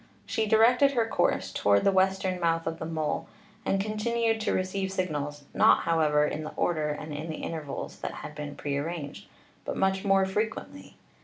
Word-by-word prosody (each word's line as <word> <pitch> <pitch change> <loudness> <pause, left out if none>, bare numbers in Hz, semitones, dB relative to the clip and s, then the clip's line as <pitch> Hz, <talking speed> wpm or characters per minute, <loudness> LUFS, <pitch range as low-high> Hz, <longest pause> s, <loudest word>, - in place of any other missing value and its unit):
She 220 -1 -1
directed 245 +6 +5
her 235 -3 +2
course - - +1
toward 100 0 +3
the 195 - +4
western 190 -1 +1
mouth 165 -1 +1
of 165 0 -3
the 160 - -4
mole, 160 -2 -2 0.4
and 195 - +1
continued 225 +2 0
to - - 0
receive 190 +1 -1
sig 185 -1 -1
nals, 145 0 -4
not, - - +5
however, 150 -3 +3
in 150 +1 -3
the 155 - -7
order 155 -3 0
and 150 +1 -5
in 155 +3 -5
the 155 - -5
intervals 155 -4 -5
that - - -4
had - - -7
been 145 -1 -6
prearranged, 145 -5 -4 0.4
but - - -4
much 190 0 +1
more 195 -1 +4
frequently. 210 +4 -4
175 Hz, 180 wpm, -28 LUFS, 150-195 Hz, 0.4 s, directed